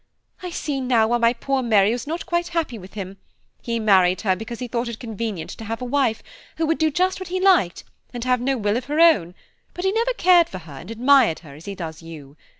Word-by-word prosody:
"I 365 Hz, -, -5 dB
see 290 Hz, -5 st, -3 dB
now 235 Hz, -4 st, +2 dB
why 240 Hz, 0 st, +2 dB
my 230 Hz, 0 st, +4 dB
poor 270 Hz, +2 st, -2 dB
Mary 215 Hz, -4 st, +3 dB
was 245 Hz, +4 st, -4 dB
not 330 Hz, +3 st, -4 dB
quite 345 Hz, 0 st, -1 dB
happy 255 Hz, -9 st, -2 dB
with 185 Hz, +1 st, -13 dB
him; 195 Hz, -1 st, -6 dB, 0.4 s
he 230 Hz, -1 st, -2 dB
married 185 Hz, -4 st, +3 dB
her 190 Hz, -3 st, +1 dB
because 225 Hz, +4 st, -7 dB
he 250 Hz, -, -5 dB
thought 235 Hz, +1 st, -2 dB
it 235 Hz, -2 st, -5 dB
convenient 220 Hz, -6 st, -5 dB
to -, -, -9 dB
have 225 Hz, +2 st, -4 dB
a 250 Hz, -, -5 dB
wife, 250 Hz, -3 st, 0 dB, 0.3 s
who 325 Hz, -, +1 dB
would 325 Hz, +1 st, 0 dB
do 315 Hz, -1 st, +3 dB
just 365 Hz, +6 st, 0 dB
what 375 Hz, -2 st, -7 dB
he 370 Hz, +1 st, -2 dB
liked, 365 Hz, -, +3 dB, 0.3 s
and 240 Hz, -2 st, -5 dB
have 250 Hz, -1 st, +1 dB
no 265 Hz, +1 st, 0 dB
will 210 Hz, 0 st, 0 dB
of 250 Hz, -, -5 dB
her 295 Hz, +2 st, -2 dB
own, 205 Hz, -, +4 dB, 0.4 s
but 355 Hz, -, -4 dB
he 385 Hz, -, +3 dB
never 465 Hz, +4 st, 0 dB
cared 360 Hz, -7 st, +4 dB
for 185 Hz, -, -7 dB
her 160 Hz, -5 st, -12 dB
and 180 Hz, -, -11 dB
admired 245 Hz, -, +4 dB
her 140 Hz, -, -11 dB
as 150 Hz, +4 st, -13 dB
he 200 Hz, -, -6 dB
does 160 Hz, -3 st, -7 dB
you. 150 Hz, -4 st, -11 dB
235 Hz, 250 wpm, -22 LUFS, 195-300 Hz, 0.4 s, my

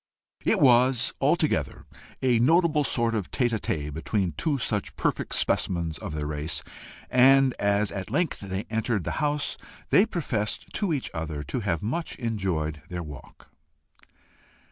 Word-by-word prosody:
It -, -, +2 dB
was 125 Hz, -1 st, +4 dB
altogether -, -, +1 dB, 0.4 s
a 125 Hz, -3 st, +4 dB
notable 155 Hz, +3 st, +4 dB
sort 120 Hz, -4 st, +1 dB
of 105 Hz, -5 st, -2 dB
tête 125 Hz, -3 st, +1 dB
à 110 Hz, -, 0 dB
tête 75 Hz, -5 st, -3 dB
between 90 Hz, +4 st, -1 dB
two 150 Hz, -, -1 dB
such 105 Hz, -4 st, -2 dB
perfect -, -, -1 dB
specimens 85 Hz, -3 st, 0 dB
of -, -, -6 dB
the 75 Hz, -1 st, -2 dB
race, 75 Hz, +2 st, -2 dB, 0.5 s
and 135 Hz, +1 st, +6 dB
as 100 Hz, 0 st, +1 dB
at 95 Hz, -1 st, -5 dB
length 175 Hz, -4 st, 0 dB
they 95 Hz, 0 st, -4 dB
entered 110 Hz, -3 st, -1 dB
the -, -, -3 dB
house, 150 Hz, -1 st, 0 dB, 0.3 s
they 205 Hz, -, +6 dB
professed 120 Hz, -, -3 dB
to 205 Hz, -5 st, 0 dB
each 145 Hz, -5 st, -2 dB
other 80 Hz, -2 st, -4 dB
to 75 Hz, -, -3 dB
have 95 Hz, -7 st, -1 dB
much 145 Hz, +10 st, -2 dB
enjoyed 95 Hz, -, -2 dB
their 90 Hz, -1 st, -4 dB
walk. 75 Hz, -3 st, -12 dB
110 Hz, 150 wpm, -26 LUFS, 85-130 Hz, 0.5 s, and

